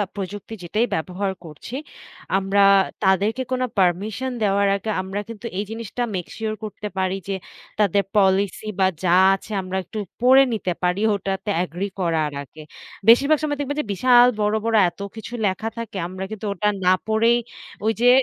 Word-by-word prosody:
প্রযুক্তি 205 Hz, +2 st, -6 dB
যেটাই 215 Hz, +7 st, +1 dB
ব্যবহার 185 Hz, +4 st, -2 dB
করছি, 160 Hz, -, -9 dB, 0.6 s
আমরা 195 Hz, +1 st, +1 dB, 0.4 s
তাদেরকে 200 Hz, +6 st, +2 dB
কোনো 255 Hz, 0 st, +1 dB
পারমিশন 200 Hz, +8 st, +1 dB
দেওয়ার 200 Hz, -1 st, +2 dB
আগে 200 Hz, +2 st, -4 dB
আমরা 190 Hz, +2 st, -4 dB
কিন্তু 230 Hz, 0 st, -9 dB
এই 200 Hz, -, 0 dB
জিনিসটা 230 Hz, +1 st, -5 dB
make 180 Hz, -, -4 dB
sure 220 Hz, -1 st, -2 dB
করতে 210 Hz, 0 st, -5 dB
পারি 190 Hz, 0 st, 0 dB
যে, 195 Hz, -, -1 dB, 0.5 s
তাদের 200 Hz, -1 st, +3 dB
পলিসি 195 Hz, +1 st, +2 dB
বা 190 Hz, -, +5 dB, 0.2 s
যা 175 Hz, -, +2 dB, 0.2 s
আছে 205 Hz, +3 st, -12 dB
আমরা 185 Hz, +1 st, -4 dB
একটু 215 Hz, +5 st, -7 dB, 0.2 s
পড়ে 260 Hz, +2 st, +7 dB
নিতে 195 Hz, -4 st, -2 dB
পারি, 180 Hz, +3 st, +1 dB
ওটাতে 195 Hz, +1 st, -3 dB
এগ্রি 180 Hz, +3 st, -4 dB
করার 165 Hz, -4 st, 0 dB
আগে। 155 Hz, +3 st, -14 dB, 0.5 s
বেশিরভাগ 280 Hz, +7 st, +6 dB
সময় 290 Hz, -1 st, -1 dB
দেখবেন 285 Hz, 0 st, -3 dB
যে -, -, -9 dB
বিশাল 245 Hz, +4 st, +6 dB
বড়, 210 Hz, 0 st, +1 dB
বড় 225 Hz, -1 st, +1 dB
এত 175 Hz, -, -23 dB, 0.2 s
কিছু 225 Hz, +2 st, -8 dB
লেখা 195 Hz, +3 st, -1 dB
থাকে 230 Hz, -4 st, -6 dB
আমরা 185 Hz, +1 st, -6 dB
কিন্তু 215 Hz, 0 st, -6 dB
ওটা 210 Hz, +2 st, -1 dB, 0.2 s
না 185 Hz, -, +6 dB
পড়েই 225 Hz, +2 st, +3 dB, 0.5 s
ওই 220 Hz, -, +4 dB
যে 245 Hz, -, +5 dB
200 Hz, 170 wpm, -22 LUFS, 190-225 Hz, 0.6 s, পড়ে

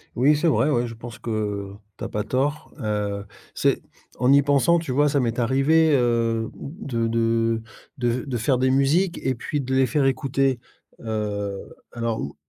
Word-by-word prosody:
Oui, 140 Hz, +5 st, +4 dB
c'est 150 Hz, +3 st, +1 dB
vrai 150 Hz, -2 st, +3 dB
ouais, 120 Hz, -4 st, +1 dB
je 115 Hz, -, -7 dB
pense 115 Hz, -1 st, -10 dB
que 105 Hz, -3 st, -3 dB, 0.2 s
tu -, -, -8 dB
as -, -, -3 dB
pas 105 Hz, -, -2 dB
tort, 140 Hz, +6 st, -1 dB
heu, 105 Hz, -2 st, -2 dB, 0.3 s
c'est -, -, +1 dB, 0.4 s
en 125 Hz, +1 st, +4 dB
y 140 Hz, 0 st, +7 dB
pensant, 145 Hz, +4 st, +3 dB
tu 165 Hz, -5 st, -5 dB
vois, 145 Hz, +3 st, +3 dB
ça 140 Hz, -, +1 dB
m'est 120 Hz, -2 st, -1 dB
arrivé, 135 Hz, +6 st, +3 dB
heu, 115 Hz, -3 st, +1 dB
mmh, 175 Hz, +10 st, -9 dB
de 115 Hz, -3 st, 0 dB
de 115 Hz, 0 st, +1 dB, 0.4 s
de 120 Hz, -, +1 dB
v 120 Hz, +1 st, 0 dB
de 130 Hz, -4 st, -2 dB
faire 125 Hz, +3 st, +1 dB
des 130 Hz, +1 st, +2 dB
musiques 155 Hz, +8 st, +2 dB
et 130 Hz, -1 st, 0 dB
puis 145 Hz, +5 st, -3 dB
de 130 Hz, 0 st, -2 dB
les 130 Hz, 0 st, +4 dB
faire 140 Hz, +3 st, +1 dB
écouter, 135 Hz, -1 st, +1 dB, 0.4 s
heu, 105 Hz, -3 st, -3 dB, 0.3 s
alors 115 Hz, -1 st, -2 dB
ou 70 Hz, -, -6 dB
125 Hz, 190 wpm, -23 LUFS, 115-140 Hz, 0.4 s, y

